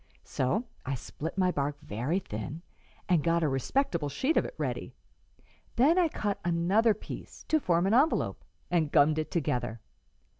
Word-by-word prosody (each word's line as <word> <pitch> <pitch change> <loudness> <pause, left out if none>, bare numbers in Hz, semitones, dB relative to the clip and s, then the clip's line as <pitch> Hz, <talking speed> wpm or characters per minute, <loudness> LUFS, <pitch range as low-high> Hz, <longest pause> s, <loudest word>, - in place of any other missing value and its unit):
So 190 - -1 0.2
I 135 +1 -2
split 160 +7 -6
my 185 -1 +3
bark 145 -2 -2
very 145 - -2
thin 145 - -5 0.4
and 170 -5 +3
got 170 0 +2
a - - +3
respectable 150 - 0
sheet 265 - 0
of - - +3
it - - -7
ready; - - -3 0.8
then 305 +9 +5
I 350 - +4
cut 205 -9 -2
another 185 +6 +3
piece, - - -9
to 315 - +4
form 175 - +2
an 195 - +2
envelope, 280 +7 +2 0.3
and 160 -4 +2
gummed 155 +2 +4
it 155 - -3
together. 125 -8 -1
170 Hz, 160 wpm, -29 LUFS, 145-210 Hz, 0.8 s, then